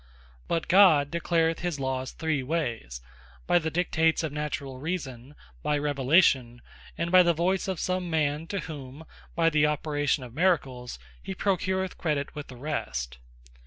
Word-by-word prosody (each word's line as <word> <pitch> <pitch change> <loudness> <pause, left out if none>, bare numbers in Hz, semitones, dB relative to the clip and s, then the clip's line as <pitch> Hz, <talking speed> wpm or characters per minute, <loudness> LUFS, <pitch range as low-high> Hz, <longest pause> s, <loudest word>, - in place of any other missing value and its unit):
But 165 -1 -1
God 170 -7 +6
declareth 165 -1 +1
his 175 -5 -3
Lawes 130 -1 -2
three 160 -3 -1
wayes; 120 - -3 0.4
by 175 - +4
the 160 -1 -2
Dictates 160 -1 +1
of 160 - -2
Naturall 145 -3 -4
Reason, 145 -5 -5 0.3
By 150 - 0
Revelation, 140 -4 +2 0.3
and 170 +1 -2
by 185 0 +8
the 170 -1 +3
Voyce 185 +4 0
of 190 -4 -2
some 185 -1 -1
Man, 155 0 0
to 200 0 -3
whom 145 -1 -9 0.3
by 165 0 +3
the 150 -1 +4
operation 145 -2 0
of 120 -2 -10
Miracles, 135 - 0 0.2
he 95 +10 -6
procureth 190 -1 -1
credit 150 -4 -1
with 150 -1 -7
the 125 - -11
rest. 60 - -4
150 Hz, 155 wpm, -27 LUFS, 135-170 Hz, 0.4 s, by